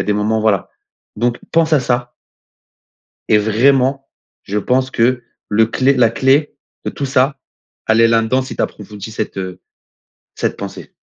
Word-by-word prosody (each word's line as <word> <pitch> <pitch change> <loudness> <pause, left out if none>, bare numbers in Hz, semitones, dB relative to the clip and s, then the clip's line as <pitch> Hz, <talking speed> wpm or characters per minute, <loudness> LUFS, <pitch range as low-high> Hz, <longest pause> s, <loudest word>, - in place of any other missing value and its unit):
a - - -1
des 105 - 0
moments, 110 +1 0
voilà. 105 -3 +1 0.5
Donc 120 +2 0
pense 160 -1 +2
à 140 - +4
ça 120 -1 -1 1.2
et 105 - +5
vraiment 130 +5 +2 0.3
je 105 +2 -2
pense 130 +4 0
que 120 +1 +1 0.3
le 110 +1 +4
clé 130 +4 +2
la 120 -3 +4
clé 135 +5 +2 0.3
de - - -2
tout 140 - -5
ça, 135 +1 +1 0.5
elle 110 +1 +3
est 115 - +6
là-dedans 115 +3 +2
si 130 - -8
tu - - 0
approfondis 105 +1 -6
cette, 110 -2 -4
heu, 95 -1 -5 0.7
cette - - -2
pensée. - - -8
120 Hz, 165 wpm, -17 LUFS, 110-130 Hz, 1.2 s, est